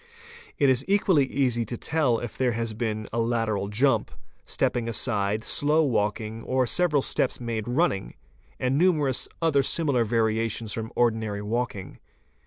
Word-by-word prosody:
It 140 - +3
is 130 0 +3
equally 190 -7 +3
easy 125 -4 0
to 120 +1 -6
tell 145 -6 +1
if 120 -2 -6
there 125 -2 +1
has 115 -1 -3
been 110 -1 -3
a 115 - 0
lateral 115 -4 -1
jump, 125 +7 +1 0.4
stepping 115 -1 -1
aside, 105 -2 0
slow 150 +6 +2
walking, 110 -3 -1
or 130 +1 0
several 150 0 +1
steps - - 0
made 115 -3 -4
running, 120 - 0 0.4
and 130 +3 +1
numerous 155 -8 +2
other 150 -4 +3
similar 140 -4 +1
variations 110 -1 0
from 110 0 -5
ordinary 110 -3 0
walking. 110 -3 -3
120 Hz, 145 wpm, -26 LUFS, 110-135 Hz, 0.4 s, It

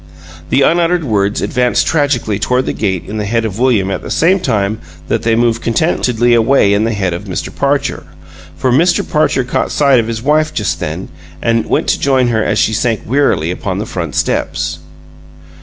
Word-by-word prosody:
The 140 - +3
unuttered 170 +2 +2
words 105 -5 0
advanced 125 -2 +1
tragically 140 -9 0
toward 125 +4 0
the - - -2
gate 95 -4 -2
in 110 - -6
the 105 - -2
head 115 +2 0
of 110 0 -4
William 115 -7 +2
at - - -3
the - - -8
same 185 +4 +2
time 105 - -1 0.3
that - - 0
they 115 -1 +1
moved 115 0 +1
contentedly 120 -3 +1
away 115 -3 +3
in 105 +2 +1
the 115 - -1
head 95 -4 -1
of 90 +5 -6
Mr. 95 -3 -5
Parcher; - - -1 0.5
for 130 - 0
Mr. 170 +8 +2
Parcher 150 -4 +1
caught 125 - -2
sight 140 -4 +3
of 115 - -1
his 115 0 -4
wife 155 +2 +1
just 80 -7 -1
then, 80 +5 -5 0.3
and 115 -1 0
went - - 0
to - - +1
join 130 -3 +2
her 110 -2 +1
as - - 0
she 110 - +2
sank 115 0 0
wearily 105 - +1
upon 90 - -4
the - - -3
front - - -5
steps. - - -1
115 Hz, 195 wpm, -14 LUFS, 105-135 Hz, 0.5 s, The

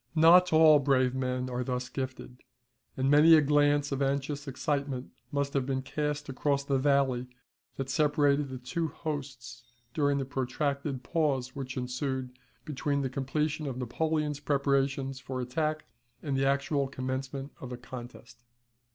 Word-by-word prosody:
Not 175 +3 +7
all 155 -2 +7
brave 130 -2 +2
men 130 -1 -2
are 125 0 -2
thus 125 0 -3
gifted; 130 -1 -6 0.6
and 130 +1 +2
many 155 +3 +8
a 155 - +6
glance 145 0 +3
of 140 0 -2
anxious 140 +1 -1
excitement 140 -1 -2 0.2
must 140 -1 -1
have 135 -2 0
been 130 -1 -1
cast 145 +2 -3
across 140 +1 0
the 140 -1 0
valley 135 -3 +2 0.5
that 135 - -4
separated 145 0 +2
the 130 - -5
two 125 +7 -2
hosts 140 -6 -6 0.3
during 145 -2 +2
the 135 - -1
protracted 135 0 -2
pause 135 -6 0
which 135 -2 -5
ensued 130 +1 -3 0.3
between 145 -1 -1
the 130 - -2
completion 150 +3 -2
of 130 -2 -4
Napoleon's 150 +4 -1
preparations 140 -2 0
for 130 0 -5
attack 155 +5 -2 0.4
and 140 -3 -1
the 135 0 +2
actual 140 0 +1
commencement 130 +1 -4
of 130 - -6
the 125 - -6
contest. 120 -1 -11
140 Hz, 150 wpm, -29 LUFS, 130-145 Hz, 0.6 s, many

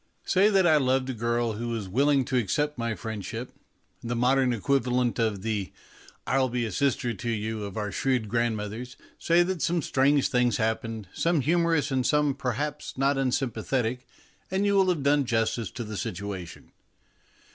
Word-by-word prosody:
Say 195 +3 +4
that 195 -3 +3
I 160 -3 +6
loved 130 -1 +1
a - - -4
girl 120 0 0
who 115 +3 -4
was 115 -4 -3
willing 135 +6 +2
to 130 - -3
accept 145 +6 0
my 115 -2 -2
friendship, 110 +2 -6 0.5
the 120 +1 -3
modern 125 +2 +3
equivalent 125 0 0
of 105 -4 0
the 105 -6 -2 0.3
" - - -24
I'll 130 -1 +2
be 120 0 -1
a 110 - -4
sister 130 -4 0
to 115 +3 -5
you 110 -1 -2
" - - -3
of 100 +1 -7
our 105 -1 -2
shrewd 130 -3 0
grandmothers, 115 +1 -2 0.2
say 170 +1 +4
that 180 -2 -3
some 170 +2 +1
strange 140 +1 +2
things 125 -3 +2
happened, 110 -1 -2
some 165 -3 +1
humorous 165 -1 +1
and 130 -1 +1
some, 150 +1 +2
perhaps, 140 +5 -4
not 135 +2 +2
unsym 135 -2 0
pathetic, 125 +2 -2 0.4
and 190 +2 0
you 200 - +2
will 190 -2 +4
have 165 -6 0
done 145 0 +3
justice 115 -3 0
to 120 - -6
the 105 -2 -6
situation. 95 -2 -6
125 Hz, 180 wpm, -27 LUFS, 110-140 Hz, 0.5 s, I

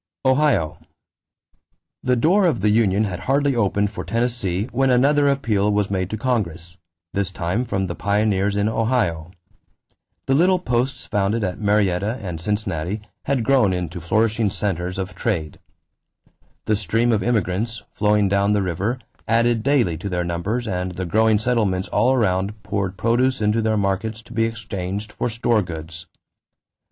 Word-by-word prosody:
=Ohio.= 130 - +2 1.2
The 125 - +2
door 180 - +3
of 130 - 0
the 105 +1 +3
union 105 -2 +3
had 95 -4 -3
hardly 140 +6 +1
opened 105 -2 +1
for - - -6
Tennessee 115 -4 -1
when 135 +2 +2
another 140 +3 +4
appeal 110 -7 +1
was 105 -1 0
made 95 -2 -1
to 110 - -3
Congress, 90 -8 -2 0.3
this 100 -2 0
time 95 +6 -2
from 95 -4 -1
the 85 - -3
pioneers 100 +1 +1
in 100 +1 +1
Ohio. 110 -8 0 1.0
The 135 - +1
little 180 +6 +4
posts 130 -5 -1
founded 105 +2 0
at 90 -2 -3
Marietta 105 +1 +1
and 90 -5 -6
Cincinnati 100 -1 -2 0.2
had 135 -4 0
grown 120 -6 +3
into 90 -1 -4
flourishing 110 +4 +1
centers 95 -2 -2
of 95 0 -4
trade. 80 -10 -2 1.1
The 110 - +2
stream 115 +5 +1
of 110 -2 +2
immigrants, 110 0 -1
flowing 105 -1 +2
down 100 +1 +2
the 100 -1 +1
river, 95 +7 -1 0.3
added 115 0 +2
daily 120 - +2
to 100 - -4
their 90 -1 -1
numbers 95 +8 -2
and 90 -2 -2
the 95 +1 -4
growing 110 +5 +3
settlements 105 -5 0
all 115 +5 +3
around 100 -4 0
poured 100 -2 -2
produce 120 +6 +1
into 105 +1 +1
their 110 -1 +1
markets 105 +3 -1
to 120 - -13
be 115 0 +2
exchanged 105 -2 -4
for 120 - -2
"store 115 0 +1
goods." 85 -1 -7
105 Hz, 155 wpm, -22 LUFS, 95-115 Hz, 1.2 s, another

